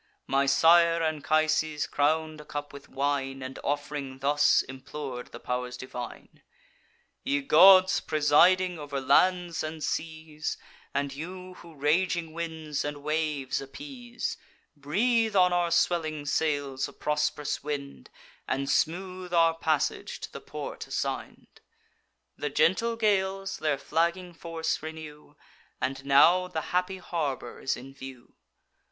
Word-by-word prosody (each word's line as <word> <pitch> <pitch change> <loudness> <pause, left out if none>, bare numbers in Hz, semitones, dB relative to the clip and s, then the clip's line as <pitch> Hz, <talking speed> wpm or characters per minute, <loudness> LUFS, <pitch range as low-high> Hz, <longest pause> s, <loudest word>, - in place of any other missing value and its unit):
My 140 0 +1
sire 165 +3 +5
Anchises 155 0 +1
crown'd 155 +1 0
a - - -15
cup 145 -1 -6
with 140 0 -12
wine, 135 -1 -2
And, 130 0 -7
off'ring, 145 -2 -3
thus 145 +2 +3
implor'd 130 -1 -7
the - - -9
pow'rs 125 0 -3
divine: 125 -2 -8 0.8
'Ye 285 +2 0
gods, 190 -7 +7
presiding 170 +4 +3
over 145 -2 -4
lands 175 +5 +2
and 155 0 -5
seas, 155 -1 -4 0.3
And 140 -1 -2
you 180 +5 -8
who 170 -2 -14
raging 165 +3 0
winds 160 -3 -4
and 145 -1 -5
waves 150 -4 -1
appease, 245 - -6 0.4
Breathe 220 - +1
on 180 -1 +5
our 175 -1 +2
swelling 160 -3 +1
sails 145 -3 0
a - - -14
prosp'rous 150 -1 -1
wind, 140 - -5 0.4
And 135 +1 -1
smooth 180 +1 -1
our 165 -1 +5
passage 160 -3 -1
to - - -7
the - - -8
port - - -7
assign'd!' - - -5 0.8
The 145 - -2
gentle 185 +11 +2
gales 195 -3 0
their 150 -3 0
flagging 170 +5 -1
force 165 -1 -3
renew, 155 -2 -9 0.4
And 135 +1 -2
now 165 +7 +5
the 165 -3 -3
happy 180 +1 0
harbour 150 -9 -4
is 135 - -1
in 135 +2 -11
view. 135 -2 -11
155 Hz, 125 wpm, -28 LUFS, 140-175 Hz, 0.8 s, gods